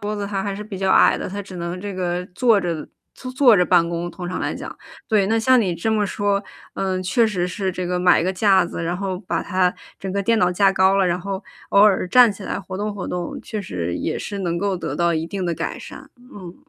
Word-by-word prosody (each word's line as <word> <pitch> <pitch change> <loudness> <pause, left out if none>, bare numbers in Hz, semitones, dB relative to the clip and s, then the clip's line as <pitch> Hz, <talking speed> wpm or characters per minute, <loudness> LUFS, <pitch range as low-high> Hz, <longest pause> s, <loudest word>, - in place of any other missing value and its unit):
桌 210 +1 -3
子， 205 -1 -3
它 200 -1 -2
还 200 0 -3
是 210 - -6
比 205 -3 -8
较 190 0 +1
矮 - - +5
的， - - -4
它 200 +2 -5
只 190 -2 -10
能 170 +1 -4
这 205 +1 -5
个 180 -1 -2
坐 230 -1 +4
着 165 -4 -3 0.3
坐 255 - -8
坐 255 -4 +5
着 180 - +4
办 175 -2 +4
公， 170 0 -3
通 180 -2 -7
常 180 - -3
来 - - -2
讲。 - - -7 0.3
对， 210 -3 +3
那 220 +3 +1
像 255 +3 +4
你 185 -6 0
这 170 +7 -2
么 215 -2 +1
说， 200 0 0 0.3
嗯， 185 -1 -2
确 190 +6 +2
实 185 -5 -1
是 190 +1 -3
这 180 0 -4
个 180 0 -1
买 180 -2 +4
个 185 +2 0
架 190 -1 +4
子， 170 - -5
然 175 +2 -2
后 190 -1 -3
把 185 - -3
它 185 -2 +1 0.2
整 190 - -5
个 200 +1 -1
电 230 +3 +2
脑 180 -4 +3
架 195 +2 +3
高 190 0 +3
了， 195 -1 +3
然 175 0 0
后 195 +2 -5 0.3
偶 200 - +5
尔 205 -3 +4
站 245 +1 +6
起 200 -1 -11
来 - - -3
活 185 0 -7
动 210 0 -3
活 195 - -5
动， 175 -1 -4
确 215 -2 -5
实 85 - -4
也 - - -2
是 205 - -5
能 175 -3 -2
够 195 +1 -1
得 - - -4
到 170 0 +1
一 160 0 -2
定 190 0 -4
的 170 - 0
改 - - -4
善。 - - -11 0.2
嗯 185 -3 -10
190 Hz, 280 characters per minute, -21 LUFS, 180-205 Hz, 0.3 s, 站